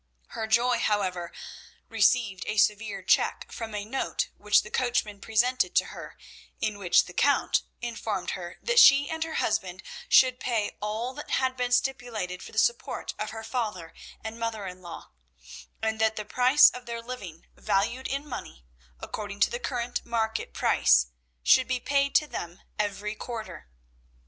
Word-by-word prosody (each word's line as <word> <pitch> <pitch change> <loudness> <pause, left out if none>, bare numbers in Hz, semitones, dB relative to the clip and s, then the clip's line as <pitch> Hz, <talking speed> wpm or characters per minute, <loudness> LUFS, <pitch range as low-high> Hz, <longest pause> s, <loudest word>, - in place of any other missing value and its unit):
Her 220 - -4
joy, 235 +2 +3
however, 185 -5 -1 0.6
received 210 -7 +2
a 215 - -2
severe 210 0 +1
check - - +1
from 225 -2 -6
a 205 -1 -3
note 265 +5 -2
which 210 0 +3
the 210 - -11
coachman 235 -5 -1
presented 245 +4 +1
to - - +4
her, - - -10 0.4
in 210 -1 -2
which 180 -3 +4
the 180 - -11
Count 285 +9 +2 0.2
informed 225 -5 -3
her 175 -1 -7
that 485 0 +4
she 280 -7 +8
and 320 0 -2
her 320 -1 -5
husband 190 -3 -1 0.3
should 255 -1 +5
pay 225 -4 -1
all 220 +4 -3
that 295 +2 -9
had 260 -1 +1
been 250 -1 -2
stipulated 235 -8 -1
for - - -10
the - - -12
support 235 +2 0
of 215 - -3
her 225 0 -7
father 215 -8 -4 0.3
and 220 +1 -6
mother 225 -3 -3
in 185 0 -8
law; 170 -2 -10 0.7
and 220 0 -1
that 220 0 +3
the 215 - -5
price 255 +3 +6
of 250 0 -10
their 235 0 -5
living 195 -10 -8
valued 240 +7 0
in 280 +2 -3
money, 65 - -8 0.4
according 205 -1 -6
to - - +4
the 240 - -3
current 245 -1 -3
market 225 -1 -2
price, 60 0 +3 0.3
should 260 - +5
be 255 -1 -1
paid 280 +2 +1
to 305 - +5
them 175 - -7 0.2
every 210 0 -2
quarter. 220 - -7
220 Hz, 165 wpm, -27 LUFS, 205-250 Hz, 0.7 s, she